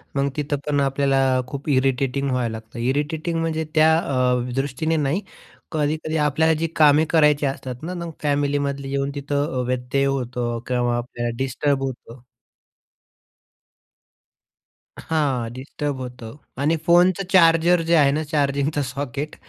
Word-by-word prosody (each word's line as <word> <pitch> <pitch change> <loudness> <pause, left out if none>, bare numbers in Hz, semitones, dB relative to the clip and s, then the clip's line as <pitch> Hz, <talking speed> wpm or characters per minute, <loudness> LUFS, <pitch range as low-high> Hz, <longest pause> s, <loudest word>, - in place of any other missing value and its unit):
मग 140 0 +1
तिथं 145 -1 -1
पण 145 -1 +1
आपल्याला 135 0 +1 0.3
खूप 140 +3 -6
इरिटेटिंग 135 0 +1
व्हायला 125 -3 0
लागतं. 110 +1 -9
इरिटेटिंग 150 +6 -1
म्हणजे 160 -1 -1
त्या 160 +1 +5
अ, 125 -5 0
दृष्टीने 140 +4 -1
नाही. 150 +6 0 0.5
कधी-कधी 155 +1 -1
आपल्याला 160 +2 +3
जी 160 +1 -1
कामे 150 0 +5
करायची 150 -3 +4
असतात 130 -1 -4
ना, 175 +3 -4
मग 170 -2 -5
फॅमिलीमधली 140 -1 -1
येऊन 140 0 -1
तिथं 145 +1 -2
अ, - - -2
व्यत्यय 125 +2 -1 0.2
येतो 120 -1 -3
किंवा 120 -1 0
आपल्याला 120 -1 -4
डिस्टर्ब 135 +2 0
होतं. 125 -2 -7 2.8
हां, 135 -7 -1
डिस्टर्ब 140 +2 -4
होतं 125 -2 -8 0.3
आणि 155 +3 +2
फोनचं 175 +2 +4
चार्जर 170 -1 +5
जे 165 +1 +2
आहे 145 -3 +5
ना 155 +2 -1
चार्जिंग 140 -2 0 0.2
सॉकेट 140 +3 -5
140 Hz, 130 wpm, -22 LUFS, 130-155 Hz, 2.8 s, त्या